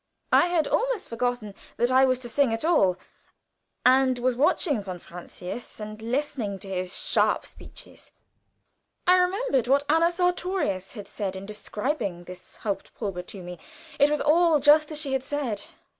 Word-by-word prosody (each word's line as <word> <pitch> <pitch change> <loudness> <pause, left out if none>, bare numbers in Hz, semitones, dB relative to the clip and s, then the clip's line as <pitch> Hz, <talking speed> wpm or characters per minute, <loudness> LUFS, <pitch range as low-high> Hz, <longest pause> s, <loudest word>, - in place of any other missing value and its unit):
I 350 - +5
had 345 -3 +1
almost - - 0
forgotten 235 -3 -2 0.2
that 240 +1 +2
I 260 +1 +6
was 255 -1 +2
to 240 - -6
sing 265 +1 +2
at 225 +6 -2
all, 200 - +4 0.9
and 260 0 +5
was 250 0 0
watching 285 - +2
von 185 -2 -6
Francius 180 +6 -8
and 215 0 -7
listening 235 -4 -2
to 195 - -11
his 185 -1 -3
sharp - - +1
speeches. - - -11 0.9
I 365 0 +6
remembered 360 - +1
what 280 +2 +3
Anna 325 +3 +4
Sartorius 355 - -1
had 205 -4 -8
said 195 -3 -4
in 190 +1 -7
describing 210 - -3
this 180 +1 -12
haupt 200 -3 -5
probe 185 -5 -5
to 190 -3 -9
me. 175 -1 -8 0.4
It 285 - +6
was 300 0 0
all 320 +1 +4
just 300 +2 +5
as 300 - -1
she 280 -3 0
had 265 - +1
said. 260 -7 -3
255 Hz, 165 wpm, -26 LUFS, 200-300 Hz, 0.9 s, I